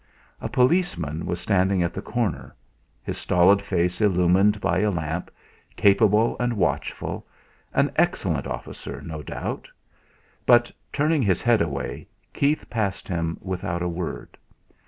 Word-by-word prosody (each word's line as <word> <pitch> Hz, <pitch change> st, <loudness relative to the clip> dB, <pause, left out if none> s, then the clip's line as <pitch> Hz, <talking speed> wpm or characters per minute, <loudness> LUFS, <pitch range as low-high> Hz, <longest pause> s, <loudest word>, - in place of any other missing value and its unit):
A -, -, -3 dB
policeman 125 Hz, -, +1 dB
was 85 Hz, -1 st, -2 dB
standing 95 Hz, -2 st, +2 dB
at 85 Hz, -, -1 dB
the -, -, -5 dB
corner, 120 Hz, -3 st, -3 dB, 0.5 s
his -, -, -4 dB
stolid 90 Hz, +3 st, +4 dB
face 90 Hz, -2 st, -1 dB
illumined 95 Hz, +1 st, +3 dB
by 85 Hz, -2 st, +1 dB
a 105 Hz, -, +2 dB
lamp; 80 Hz, -1 st, -3 dB, 0.5 s
capable 105 Hz, +2 st, +4 dB
and 120 Hz, -1 st, 0 dB
watchful 105 Hz, -, -2 dB, 0.4 s
an -, -, +2 dB
excellent -, -, +1 dB
officer, -, -, -6 dB
no 80 Hz, -2 st, -6 dB
doubt; -, -, -5 dB, 0.8 s
but, 120 Hz, 0 st, +5 dB, 0.2 s
turning 150 Hz, +1 st, +2 dB
his 95 Hz, -7 st, +1 dB
head 120 Hz, -2 st, +4 dB
away, 70 Hz, -5 st, -3 dB, 0.3 s
Keith 145 Hz, +2 st, +1 dB
passed 105 Hz, -4 st, -2 dB
him 85 Hz, -3 st, -2 dB
without 90 Hz, -2 st, -3 dB
a -, -, 0 dB
word. 85 Hz, -1 st, -5 dB
95 Hz, 135 wpm, -24 LUFS, 85-110 Hz, 0.8 s, but